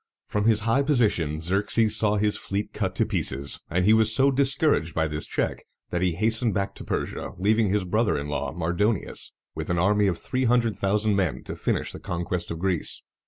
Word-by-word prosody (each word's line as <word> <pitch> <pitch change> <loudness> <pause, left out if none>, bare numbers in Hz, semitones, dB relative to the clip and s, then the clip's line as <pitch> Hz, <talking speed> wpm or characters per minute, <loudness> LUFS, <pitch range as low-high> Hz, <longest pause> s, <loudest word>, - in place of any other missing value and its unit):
From 105 0 -2
his 110 -1 +4
high 115 +5 +2
position, 105 - +1
Xerxes 105 +5 +2
saw 105 -1 +2
his 105 0 +1
fleet 100 +1 -4
cut - - -2
to - - +2
pieces; 70 +1 0
and 90 +2 +1
he 110 - +6
was 110 0 +5
so 140 +1 +4
discouraged 135 - +2
by 80 -1 +1
this 75 0 -2
check, - - -2 0.3
that 85 - -1
he 90 -2 +1
hastened 110 +3 0
back 100 0 -1
to - - -10
Persia, - - -4
leaving 105 +3 +2
his 105 -1 +1
brother 110 +3 +1
in 70 0 -4
law 75 -1 -3
Mar 85 +1 -2
do´ni 105 +2 +1
us - - -3 0.2
with - - -6
an 90 - 0
army 100 +3 +3
of 90 -3 0
three 130 0 -1
hundred 120 -2 +2
thousand 105 +1 +1
men 95 -5 -1
to - - -6
finish - - -1
the - - -8
conquest 85 0 -3
of 85 - -4
Greece. 90 -1 -2
100 Hz, 215 wpm, -25 LUFS, 85-110 Hz, 0.3 s, he